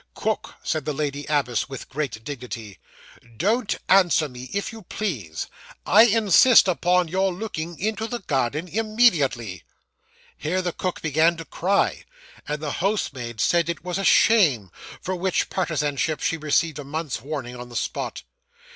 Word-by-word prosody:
'Cook,' - - -2
said 155 -3 -2
the 150 - -2
lady 145 -1 -3
abbess, 135 -5 0
with 135 -2 -7
great 130 -6 -4
dignity; 115 -7 -7 0.6
'don't 220 - +1
answer 180 -5 +4
me, 125 -1 -10
if 200 +2 -3
you 225 - -9
please. 130 - -4 0.4
I 215 +4 +7
insist 225 +1 +6
upon 180 0 +2
your 190 +3 +1
looking 175 -4 -5
into 220 +2 -1
the 240 - -3
garden 150 - -1
immediately.' 170 - +1 0.7
Here 180 +5 -2
the 175 -2 -2
cook 185 -1 -4
began 160 +2 +3
to 165 - -7
cry, 195 +5 0 0.4
and 150 +1 -3
the 150 - -2
housemaid 130 - -2
said 170 +7 +2
it 170 -2 -4
was 180 +1 -2
'a - - -2
shame!' 150 - +4 0.3
for 185 - -2
which 185 +1 -1
partisanship 155 -3 -1
she - - 0
received 155 0 0
a - - -5
month's 150 -3 -4
warning 135 -3 -5
on 125 0 -9
the 120 - -11
spot. - - -3
160 Hz, 155 wpm, -24 LUFS, 135-190 Hz, 0.7 s, I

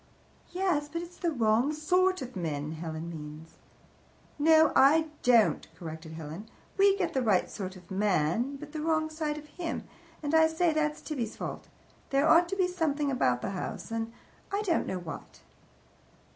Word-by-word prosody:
"Yes, 350 -5 0
but 335 +2 -4
it's 345 +1 -12
the 345 - +1
wrong 235 +1 +2
sort 365 +2 +2
of 250 -1 -9
men, 155 -4 -3
Helen 160 0 -5
means." 155 0 -10 0.8
"No, 315 +1 +6
I 315 +4 +5
don't," 235 -3 +4
corrected 160 -2 -8
Helen. 160 +7 -8 0.3
"We 395 0 +5
get 360 -4 -1
the 265 - +1
right 210 -6 +2
sort 190 -2 -6
of 180 0 -15
man, 200 - +1
but 295 +1 -9
the 310 -1 -4
wrong 315 0 +1
side 310 -1 -2
of 300 - -9
him, 330 +2 -5 0.4
and 290 +1 -2
I 320 0 +6
say 320 +1 +1
that's 300 -1 0
Tibby's 245 -8 -4
fault. - - -6 0.4
There 275 +2 +3
ought 340 +2 +6
to 390 - -1
be 380 -2 +2
a - - -2
something 300 -5 0
about 125 - +1
the - - -2
house 195 +4 -5
an 225 0 -2 0.4
I 400 +1 0
don't 350 -5 +1
know 190 - -2
what." 175 -3 -9
285 Hz, 175 wpm, -29 LUFS, -, 0.8 s, No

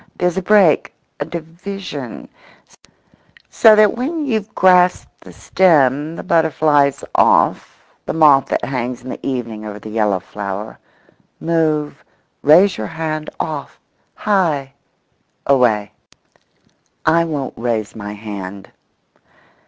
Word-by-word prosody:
—there's 180 -1 0
a 190 - -1
break—a 190 -5 +1
division—so 190 +5 -3
that 215 -1 +4
when 295 +6 -3
you've 220 -5 -2
grasped 180 -1 +3
the - - -13
stem 150 -4 +2
the - - -7
butterfly's 150 -5 +2
off—the - - 0
moth 145 -5 +5
that - - -2
hangs 125 -2 -4
in 130 - -7
the - - -9
evening 115 -5 -4
over 105 -1 -7
the 105 +1 -10
yellow 105 -3 0
flower—move, 150 - -5 0.4
raise 180 +6 +5
your - - -3
hand, 155 -1 -4
off, 155 -4 -5 0.4
high, 160 -10 0 0.7
away. 120 -7 +2 1.1
I 170 +1 +3
won't 150 -5 -4
raise 115 -3 -3
my 105 -2 -7
hand. 100 -2 -8
150 Hz, 105 wpm, -18 LUFS, 120-180 Hz, 1.1 s, moth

